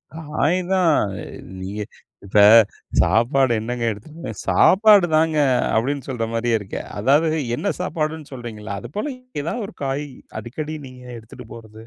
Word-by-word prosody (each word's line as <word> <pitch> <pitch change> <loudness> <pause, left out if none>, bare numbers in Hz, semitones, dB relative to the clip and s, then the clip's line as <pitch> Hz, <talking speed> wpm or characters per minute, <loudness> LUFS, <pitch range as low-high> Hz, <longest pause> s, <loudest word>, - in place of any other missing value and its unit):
காய் 155 +2 0
தான் 180 -3 +4 0.3
அ - - -7 0.4
நீங்க 100 +3 -5 0.4
இப்ப 100 +1 +2 0.6
சாப்பாடு 120 - +2
என்னங்க 120 +1 -3
எடுத் 155 +11 -9
சாப்பாடு 205 -1 +6
தாங்க 160 0 +2 0.4
அப்படின்னு 135 +5 0
சொல்ற 120 -4 -2
மாரியே 115 0 +1
இருக்கு. 100 -2 -6 0.2
அதாவது 155 +7 +3 0.2
என்ன - - -1
சாப்பாடுன்னு 155 -1 -3
சொல்றீங்கள்ல 110 -5 -6
அது 120 - -9
போல் 215 +8 -2 0.3
ஏதாவது 205 +9 -3
ஒரு - - -13
காய் 140 +2 -2 0.3
அடிக்கடி 155 +6 -6
நீங்க 125 -1 -13 0.2
எடுத்துட்டு 115 +2 -13
போறது. 110 -1 -12
135 Hz, 135 wpm, -21 LUFS, 115-155 Hz, 0.6 s, சாப்பாடு